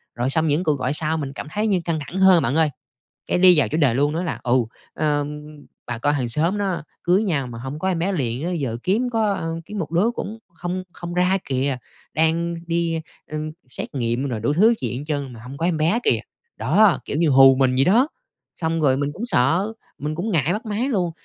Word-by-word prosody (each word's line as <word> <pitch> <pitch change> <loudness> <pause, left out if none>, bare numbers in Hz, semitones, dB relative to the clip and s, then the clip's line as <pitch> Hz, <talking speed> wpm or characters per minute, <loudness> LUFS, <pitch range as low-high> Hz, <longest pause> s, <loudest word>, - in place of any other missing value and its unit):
Rồi 120 +2 0
xong 160 +3 +2
những 150 +4 +1
cuộc 150 -5 +1
gọi 135 - 0
sau 155 +1 +1
mình 140 -3 -4
cảm 140 - -7
thấy 210 +4 0
như 195 -4 +2
căng 165 -2 -1
thẳng 180 - -6
hơn 190 -5 +6
bạn 130 +4 0
ơi, 160 -1 +4 0.6
cái - - +1
đi 180 -3 +7
vào 135 - +3
chủ 135 - -2
đề 140 -7 +3
luôn, 145 +3 +1
nói 170 +3 -1
là: 165 - -3
"Ừ, 120 - +1 0.4
ờm, 150 -1 -1 0.4
bà 120 -1 -4
con 145 +5 +1
hàng 130 -4 -1
xóm 165 - 0
nó 195 -6 -1 0.2
cưới 180 +4 +3
nhau 150 -10 -1
mà 115 -1 -8
hông 135 +5 -6
có 190 - -1
em 175 -3 0
bé 190 +4 0
liền 135 -5 -2
á, 180 - -1
giờ 135 -10 -2
kiếm 225 +7 +1
có 205 -7 0
kiếm 210 +3 -7
một 160 -4 -4
đứa 190 +8 +2
cũng 220 +2 -5
không 175 +2 -4
không 170 0 -7
ra 180 +2 +2
kìa. 130 0 0 0.4
Đang 165 +2 +1
đi, 165 -1 0 0.3
ưm, 155 0 -4 0.2
xét 125 - -6
nghiệm 120 +1 -1
rồi 120 -5 -3
đủ 115 +7 0
thứ 215 +9 +5
chuyện 125 - -3
hết 140 - -5
trơn 140 -4 -3
mà 115 - -11
hông 130 +3 -9
có 165 - -1
em 175 -2 +1
bé 165 +10 +2
kìa!" - - +3 0.4
Đó, 215 -5 +4
kiểu - - -3
như 165 -1 +3
hù 135 -1 +7
mình 130 -1 +2
vậy 135 +1 +3
đó. 235 +9 +4 0.5
Xong 160 0 0
rồi 135 -3 +3
mình 140 0 -1
cũng 220 - -5
sợ, 180 - +2 0.2
mình 150 +2 -3
cũng 200 +7 -2
ngại 160 0 +2
bắt 210 - -4
máy 220 +5 -1
luôn. 185 -9 0
160 Hz, 240 wpm, -22 LUFS, 140-185 Hz, 0.6 s, đi